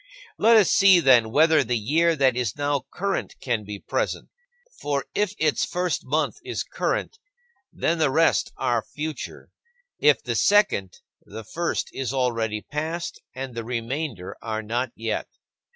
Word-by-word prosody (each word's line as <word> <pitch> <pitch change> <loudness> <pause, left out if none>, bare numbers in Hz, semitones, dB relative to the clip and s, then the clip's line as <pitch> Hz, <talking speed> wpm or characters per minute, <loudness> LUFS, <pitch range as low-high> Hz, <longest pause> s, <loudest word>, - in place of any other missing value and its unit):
Let 230 0 +6
us 205 -5 +4
see, 195 -2 +6
then, 125 -7 +5
whether 160 +5 +4
the 125 - 0
year 160 +10 +2
that 135 -4 +3
is 125 -3 -2
now 145 -2 -1
current 195 0 -2
can 120 -4 -1
be 105 0 -7
present. - - -3 0.5
For 140 -1 -2
if 210 -1 0
its 155 -2 +1
first 180 -2 -2
month 155 +4 0
is - - -3
current, 450 - -3 0.5
then 165 0 -1
the 155 - +3
rest 160 +4 +2
are 120 -2 +1
future; 155 +4 -7 0.5
if - - +4
the - - -2
second, 200 - +2 0.2
the 110 - -9
first 170 +10 -3
is 135 -1 -3
already 115 -4 0
past, 160 +3 -4
and 130 -1 -5
the 115 0 -4
remainder 120 - -4
are 110 -1 -3
not 120 +4 -2
yet. 115 -1 -3
135 Hz, 150 wpm, -24 LUFS, 115-165 Hz, 0.5 s, Let